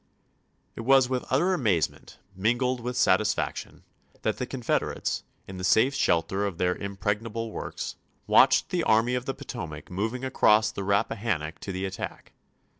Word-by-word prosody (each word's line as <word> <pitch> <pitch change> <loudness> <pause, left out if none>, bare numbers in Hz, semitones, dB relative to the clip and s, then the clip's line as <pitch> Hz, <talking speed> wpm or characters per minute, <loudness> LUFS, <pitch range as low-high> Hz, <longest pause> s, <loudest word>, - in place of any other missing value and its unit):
It - - -5
was 130 +1 +4
with 130 -1 -1
utter 170 +9 +2
amazement, 105 - -1 0.2
mingled 120 +6 +1
with 125 +1 -4
satis 110 -3 +3
faction, - - -5 0.4
that - - 0
the - - -3
Confederates, - - -1 0.3
in 95 - -8
the 90 - -6
safe 115 +8 +4
shelter 95 -4 +1
of 95 -4 -6
their 90 0 +1
impregnable 105 +4 -3
works, - - -5 0.3
watched - - +5
the 175 -2 0
Army 115 +1 +3
of 125 0 -2
the 135 - -3
Potomac 85 - -7
mo\ing 110 +8 -2
across 110 -4 +4
the 100 - -5
Rappahannock 100 -5 -1
to 100 - -6
the 95 +1 -3
attack. 95 0 -6
110 Hz, 155 wpm, -27 LUFS, 95-125 Hz, 0.4 s, watched